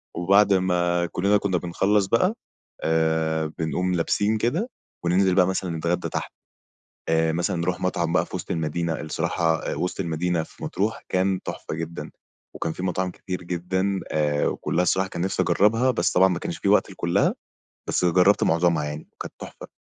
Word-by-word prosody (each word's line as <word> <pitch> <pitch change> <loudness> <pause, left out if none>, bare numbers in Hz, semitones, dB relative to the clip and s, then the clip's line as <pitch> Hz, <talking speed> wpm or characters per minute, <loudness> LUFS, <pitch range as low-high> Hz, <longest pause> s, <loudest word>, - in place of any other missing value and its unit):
وبعد 100 +4 +4
ما 90 -2 +1
كُلّنا 100 +4 +2
كنا 95 -3 0
بنخلّص 95 +4 +1
بقى 115 - +2 0.5
آآ 80 -1 +1
بنقوم 90 +3 0
لابسين 105 +6 +1
كده 155 - 0 0.4
وننزل 90 +1 +3
بقى 90 -2 +5
مثلًا 95 -3 -2
نتغدى 85 +2 -1
تحت. - - -4 0.8
آآ 80 0 +2
مثلًا 85 +2 -1
نروح 90 +2 -1
مطعم 85 -2 0
بقى - - +3
في - - -8
وسط - - -5
المدينة، 80 0 -2
الصراحة 80 +1 0 0.2
آآ - - -3
وسط 90 - -3
المدينة 85 -1 -1
في - - -14
مطروح 105 +4 -2
كان 95 0 +1
تحفة - - -6
جدًا، 80 +1 -6 0.4
وكان 80 - -2
فيه 90 - -6
مطاعم 90 0 -1
كتير 90 0 -6
جدًا 95 +3 -1
آآ 75 -1 +1
وكُلّها 90 - -1
الصراحة 95 +2 +1
كان 85 - -5
نفسي 95 +2 0
أجربها، 115 +5 +3
بس 85 -8 0
طبعًا 95 +1 +5
ما 90 -3 -1
كانش - - -4
في - - -3
وقت - - +4
لكُلّها - - +1 0.5
بس - - +1
جربت 90 +3 +4
معظمها 85 -2 +2
يعني 75 +1 -6
كانت - - -6
تحفة. - - -10
90 Hz, 170 wpm, -24 LUFS, 80-95 Hz, 0.8 s, بقى